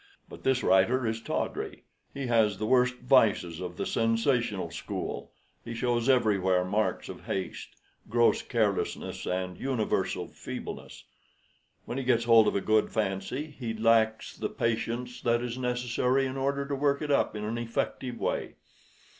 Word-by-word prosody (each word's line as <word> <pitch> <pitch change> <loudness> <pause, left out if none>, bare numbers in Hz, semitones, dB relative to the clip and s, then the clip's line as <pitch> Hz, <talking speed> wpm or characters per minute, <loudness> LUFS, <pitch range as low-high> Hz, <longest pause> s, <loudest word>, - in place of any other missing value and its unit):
But - - -11
this 130 -1 +1
writer 120 +7 +4
is 110 0 -1
tawdry; - - -3 0.3
he 140 -1 -5
has 110 -4 +3
the 110 - -2
worst 125 +1 +3
vices 105 -10 +3
of 90 -1 -6
the - - -2
sensational 115 - +1
school 85 - -5 0.3
he 115 - -6
shows 120 +1 0
everywhere 95 -7 +3
marks 100 0 0
of - - -9
haste, 95 -1 -4 0.3
gross 120 +1 +3
carelessness, 110 -5 -1
and 90 -1 -2
universal 130 -5 -1
feebleness. - - -8 0.8
When 125 - -3
he - - -3
gets 120 -2 +2
hold 115 -2 +6
of - - +1
a 100 - +1
good 110 +1 +2
fancy, 110 +8 -2
he 120 -5 -5
lacks 110 0 +2
the - - -3
patience 120 +2 -2
that 120 0 +1
is 120 -1 -3
necessary 125 +1 +1
in 130 0 -3
order 140 +1 -1
to 145 - -3
work 140 +1 +1
it 150 - -2
up 140 - +2
in 105 - -4
an 115 +2 -2
effective 120 +1 -3
way. - - -2
115 Hz, 155 wpm, -29 LUFS, 105-125 Hz, 0.8 s, hold